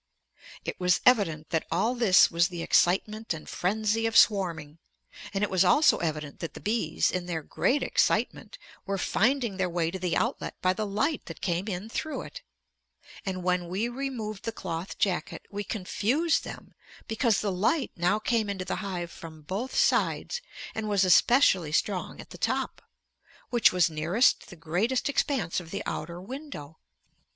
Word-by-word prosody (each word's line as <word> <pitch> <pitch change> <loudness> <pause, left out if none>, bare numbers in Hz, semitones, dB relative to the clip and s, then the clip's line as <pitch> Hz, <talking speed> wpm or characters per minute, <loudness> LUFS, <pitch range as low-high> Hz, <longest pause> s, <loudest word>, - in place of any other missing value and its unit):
It - - -4
was 180 -1 +3
evident 165 -11 +3
that 160 - 0
all 195 +9 +1
this 230 -7 +5
was 170 0 +3
the 175 -2 -6
excitement 210 +2 +2
and 155 - -10
frenzy 215 +4 0
of 225 - +2
swarming. 170 -7 +3 0.5
And 195 +1 -1
it 210 - +1
was 185 -1 +4
also 300 - +5
evident 155 -3 -3
that 165 - -6
the - - -7
bees, 210 -7 0
in 180 -1 -3
their 165 -3 -3
great 275 - 0
excitement, - - 0 0.3
were 195 0 -1
finding 230 +2 +1
their 185 -2 0
way 170 -1 -1
to 190 - -5
the 180 -1 0
outlet - - -2
by 185 0 +2
the 215 +1 -3
light 275 +10 -1
that - - -8
came 180 +2 -1
in 195 +1 -4
through 310 +7 -4
it. - - -10 0.9
And 185 -1 -3
when 180 -1 0
we 195 +7 -1
removed 240 -5 -4
the 230 - -2
cloth 175 -4 -5
jacket 185 -3 -1
we 205 0 -3
confused 230 - 0
them - - -9 0.3
because 225 -1 +1
the 205 - -1
light 225 - 0
now 180 +4 +2
came 220 -1 0
into 190 -2 -3
the 185 - -2
hive 175 -3 -4
from 160 -2 -11
both 200 - -4
sides 485 - +1 0.3
and 220 -1 -3
was 200 -2 +3
especially 185 - +4
strong 185 +3 -1
at - - -11
the - - -10
top, - - -1 0.7
which 240 -3 +5
was 180 -2 +3
nearest 165 +10 +2
the 185 - -10
greatest 185 - -1
expanse 265 - 0
of 170 -2 -11
the 200 - -4
outer 170 +3 -4
window. 195 - -8
190 Hz, 170 wpm, -28 LUFS, 175-225 Hz, 0.9 s, this